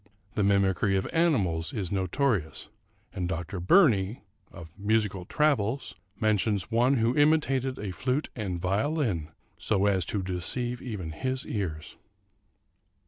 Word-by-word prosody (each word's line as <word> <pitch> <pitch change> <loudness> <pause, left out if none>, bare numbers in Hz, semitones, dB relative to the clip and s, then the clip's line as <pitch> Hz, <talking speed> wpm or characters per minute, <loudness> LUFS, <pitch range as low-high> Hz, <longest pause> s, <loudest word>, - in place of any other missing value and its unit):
The 105 - 0
mimicry 100 0 +2
of 95 - -1
animals 105 - +1
is 100 -7 -3
notorious; 95 - -1 0.4
and 90 -1 -3
Dr. 90 +1 -4
Burney 110 - +3 0.5
("Musical 105 -2 0
Travels") 135 -2 0 0.3
mentions 110 -1 +1
one 120 +4 +3
who 115 0 +1
imitated 135 -4 +2
a 100 -2 -4
flute 130 - -1
and 95 -7 -3
violin, 100 - 0 0.3
so 100 -2 +1
as 95 -3 +2
to 100 +1 -2
deceive 120 +7 -3
even 100 -10 -5
his 130 - -3
ears. 85 -8 -4
105 Hz, 120 wpm, -28 LUFS, 95-130 Hz, 0.5 s, Burney